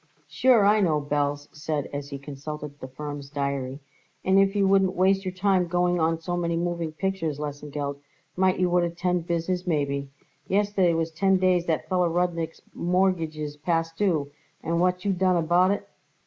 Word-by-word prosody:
"Sure, 245 Hz, -6 st, +4 dB
I 210 Hz, +1 st, +5 dB
know," 160 Hz, -6 st, +2 dB
Belz 145 Hz, 0 st, -1 dB
said 150 Hz, -2 st, -3 dB
as 145 Hz, 0 st, -5 dB
he 140 Hz, -, -5 dB
consulted 145 Hz, +1 st, -7 dB
the 130 Hz, -, -7 dB
firm's 145 Hz, +1 st, -7 dB
diary; 140 Hz, -2 st, -3 dB, 0.5 s
"and 190 Hz, +1 st, +5 dB
if 195 Hz, +1 st, +3 dB
you 200 Hz, -1 st, +3 dB
wouldn't 195 Hz, -1 st, +3 dB
waste 190 Hz, +2 st, +3 dB
your 185 Hz, -, -3 dB
time 185 Hz, -1 st, +1 dB
going 175 Hz, 0 st, +1 dB
on 165 Hz, 0 st, +1 dB
so 175 Hz, +2 st, -3 dB
many 170 Hz, -1 st, -1 dB
moving 170 Hz, -1 st, -2 dB
pictures, 165 Hz, -3 st, -2 dB
Lesengeld, 145 Hz, -1 st, -4 dB, 0.4 s
might 185 Hz, 0 st, +2 dB
you 180 Hz, -, +3 dB
would 175 Hz, 0 st, +3 dB
attend 175 Hz, +1 st, 0 dB
to 165 Hz, -, -15 dB
business 175 Hz, +2 st, -1 dB
maybe. 140 Hz, -4 st, -1 dB, 0.4 s
Yesterday 195 Hz, -3 st, +2 dB
was 165 Hz, 0 st, -1 dB
ten 190 Hz, +4 st, +2 dB
days 185 Hz, -2 st, +2 dB
that 155 Hz, -1 st, -1 dB
feller 180 Hz, 0 st, +2 dB
Rudnik's 170 Hz, -1 st, -1 dB
mortgage 175 Hz, -3 st, +1 dB
is 150 Hz, -1 st, -5 dB
past 165 Hz, +1 st, -1 dB
due, 160 Hz, -8 st, 0 dB, 0.3 s
and 170 Hz, +1 st, 0 dB
what 180 Hz, 0 st, +3 dB
did 180 Hz, +2 st, -17 dB
you 200 Hz, -, +2 dB
done 185 Hz, 0 st, +2 dB
about 175 Hz, +3 st, +3 dB
it? 200 Hz, 0 st, -1 dB
170 Hz, 185 wpm, -26 LUFS, 150-185 Hz, 0.5 s, I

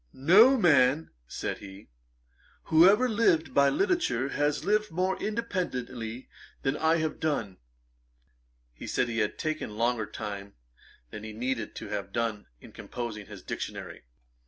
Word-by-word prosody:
'No 205 Hz, -, +6 dB
man 145 Hz, -, +3 dB, 0.2 s
(said -, -, -4 dB
he) 95 Hz, 0 st, -12 dB, 0.8 s
who 165 Hz, +3 st, +6 dB
ever 215 Hz, +6 st, +4 dB
lived 170 Hz, -, +2 dB
by 140 Hz, +1 st, +5 dB
literature, 335 Hz, -, 0 dB
has 145 Hz, +1 st, 0 dB
lived 215 Hz, +1 st, +2 dB
more 185 Hz, +3 st, 0 dB
independently 130 Hz, -, -3 dB, 0.4 s
than 135 Hz, +1 st, +1 dB
I 160 Hz, +2 st, +2 dB
have 160 Hz, -1 st, -2 dB
done.' 125 Hz, -12 st, -2 dB, 1.2 s
He -, -, -9 dB
said 125 Hz, -, 0 dB
he 115 Hz, -1 st, -2 dB
had 105 Hz, -1 st, -1 dB
taken 155 Hz, -9 st, -3 dB
longer 115 Hz, -2 st, 0 dB
time 100 Hz, -2 st, -7 dB, 0.6 s
than 105 Hz, -, -8 dB
he 110 Hz, 0 st, -7 dB
needed 120 Hz, 0 st, -3 dB
to 110 Hz, -, -7 dB
have 100 Hz, -2 st, -4 dB
done 115 Hz, -2 st, -2 dB
in -, -, -14 dB
composing 110 Hz, -4 st, -6 dB
his 100 Hz, -3 st, -11 dB
Dictionary. -, -, -6 dB
130 Hz, 140 wpm, -28 LUFS, 110-170 Hz, 1.2 s, No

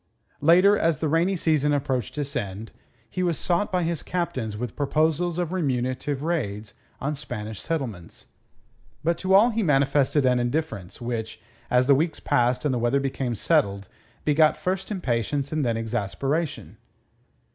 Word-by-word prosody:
Later, 180 Hz, +7 st, +6 dB
as 165 Hz, -1 st, +2 dB
the 160 Hz, -, -1 dB
rainy 165 Hz, +5 st, +2 dB
season 155 Hz, -4 st, +2 dB
approached 135 Hz, -3 st, -2 dB
its 145 Hz, 0 st, -3 dB
end, 100 Hz, +1 st, -4 dB, 0.4 s
he 185 Hz, -, -4 dB
was 175 Hz, -3 st, +1 dB
sought 180 Hz, +3 st, 0 dB
by 180 Hz, -1 st, +1 dB
his 165 Hz, -2 st, -1 dB
captains 130 Hz, -12 st, -3 dB
with 120 Hz, 0 st, -5 dB
proposals 160 Hz, +4 st, +1 dB
of 175 Hz, -2 st, -1 dB
remunerative 135 Hz, -3 st, -1 dB
raids 105 Hz, -11 st, -2 dB, 0.3 s
on 150 Hz, +3 st, -2 dB
Spanish 110 Hz, -8 st, -6 dB
settlements. 120 Hz, -, -5 dB, 0.7 s
But 170 Hz, +1 st, +1 dB
to 190 Hz, 0 st, +3 dB
all 225 Hz, +5 st, +6 dB
he 225 Hz, 0 st, -1 dB
manifested 140 Hz, -3 st, +2 dB
an 125 Hz, -1 st, +3 dB
indifference 120 Hz, -, -3 dB
which, 115 Hz, -2 st, -4 dB, 0.3 s
as 125 Hz, 0 st, +3 dB
the 140 Hz, -, +6 dB
weeks 155 Hz, +4 st, 0 dB
passed 125 Hz, -1 st, +1 dB
and 145 Hz, -, +2 dB
the 125 Hz, -, 0 dB
weather 120 Hz, +4 st, +2 dB
became 135 Hz, -3 st, -2 dB
settled, 100 Hz, -, +1 dB, 0.4 s
begot 155 Hz, +1 st, +4 dB
first 190 Hz, +1 st, -2 dB
impatience 140 Hz, -, -1 dB
and 155 Hz, -1 st, 0 dB
then 115 Hz, -3 st, 0 dB
exasperation. 120 Hz, -, -2 dB
140 Hz, 155 wpm, -25 LUFS, 120-165 Hz, 0.7 s, Later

